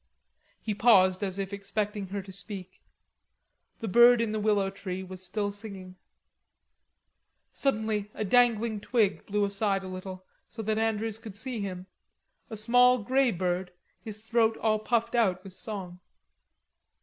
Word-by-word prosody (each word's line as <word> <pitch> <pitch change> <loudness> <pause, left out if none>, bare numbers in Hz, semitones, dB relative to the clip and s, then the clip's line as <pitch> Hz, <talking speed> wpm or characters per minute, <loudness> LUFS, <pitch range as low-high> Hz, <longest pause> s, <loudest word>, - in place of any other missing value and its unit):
He 215 - -3
paused 195 -3 +5
as 190 -1 -2
if 195 0 -4
expecting 200 0 -3
her 195 +1 -4
to 190 0 -11
speak. 190 -1 -6 1.0
The 225 - -3
bird 240 +4 +7
in 230 -2 0
the 215 - -1
willow 205 -2 +1
tree 190 -1 -5
was 185 0 -8
still 205 +2 -2
singing. 200 -3 -9 1.6
Suddenly 220 -6 -1
a 215 - -2
dangling 230 -1 +3
twig 215 -4 +1
blew 205 0 +1
aside 200 -1 0
a - - -6
little 185 0 -7 0.2
so 225 - -7
that 215 +1 0
Andrews 225 0 -1
could 215 -3 -8
see 245 +1 -2
him 185 -2 -5 0.6
a 220 - -6
small 245 +3 +5
grey 260 +3 +3
bird, 180 -1 -2 0.3
his 215 0 -8
throat 225 -1 +2
all 215 -1 +1
puffed 230 +1 0
out 190 -6 +2
with 195 -2 -10
song. 185 -4 -7
210 Hz, 150 wpm, -28 LUFS, 190-225 Hz, 1.6 s, bird